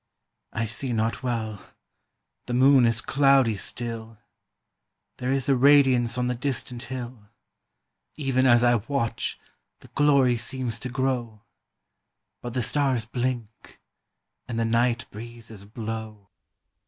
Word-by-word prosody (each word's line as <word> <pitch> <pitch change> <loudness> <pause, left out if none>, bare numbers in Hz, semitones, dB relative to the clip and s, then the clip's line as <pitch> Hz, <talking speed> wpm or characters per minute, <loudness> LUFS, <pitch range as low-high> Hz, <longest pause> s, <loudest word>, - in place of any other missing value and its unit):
"I 115 - -2
see 120 +3 -2
not 115 0 -1
well, 110 -5 -3 0.8
the 120 - -2
moon 130 -1 +6
is 115 0 +1
cloudy 135 -5 +3
still, 115 +1 -5 1.0
There 125 +1 -2
is 135 -1 0
a 135 - +4
radiance 130 -3 +4
on 125 - 0
the 125 - 0
distant 125 -1 -3
hill; 120 -5 -7 0.9
Even 130 -3 +1
as 120 -1 +5
I 120 0 +5
watch 140 -5 -2 0.4
the - - -16
glory 140 -4 +3
seems 120 -1 -3
to 125 - -5
grow; 125 -4 -2 1.0
But 120 0 -7
the 125 - +1
stars 135 -3 +1
blink, 120 -2 -4 0.7
and 115 -2 -3
the 115 - +1
night 120 +1 +1
breezes 115 -2 -10
blow." 110 -2 -7
120 Hz, 125 wpm, -25 LUFS, 115-130 Hz, 1.0 s, moon